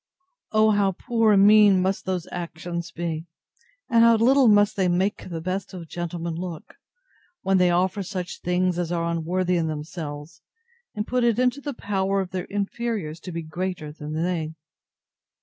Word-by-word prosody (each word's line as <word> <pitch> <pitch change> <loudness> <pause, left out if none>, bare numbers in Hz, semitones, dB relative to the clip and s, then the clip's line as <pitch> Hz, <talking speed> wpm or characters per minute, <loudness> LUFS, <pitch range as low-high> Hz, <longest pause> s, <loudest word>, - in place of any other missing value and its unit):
O 215 0 +4
how 200 -2 +2
poor 225 +2 +2
and 195 0 +6
mean 210 -2 +7
must 190 +1 -1
those 185 -3 -2
actions 170 0 -5
be, 165 -1 -4 0.6
and 230 -3 +4
how 230 0 +7
little 255 +4 +5
must 205 -1 +5
they 190 -2 +1
make 185 +3 0
the 165 -2 -5
best 185 +2 -4
of 170 -2 -8
gentlemen 170 0 -4
look, 170 -1 -7 0.7
when 190 0 +3
they 180 -1 +4
offer 185 +3 +1
such 180 -2 -5
things 180 0 0
as 175 -1 -2
are 170 -1 0
unworthy 175 +2 0
of 165 -1 0
themselves, 150 0 -6 0.5
and 210 0 -2
put 250 +1 0
it 235 -2 +3
into 255 +2 +1
the 285 -2 -5
power 195 -2 -1
of 190 -1 -3
their 185 -1 -3
inferiors 200 -5 -3
to 180 - -8
be 165 -1 -4
greater 175 -1 -4
than 150 0 -7
they! 160 -1 -2
180 Hz, 170 wpm, -24 LUFS, 170-205 Hz, 0.7 s, mean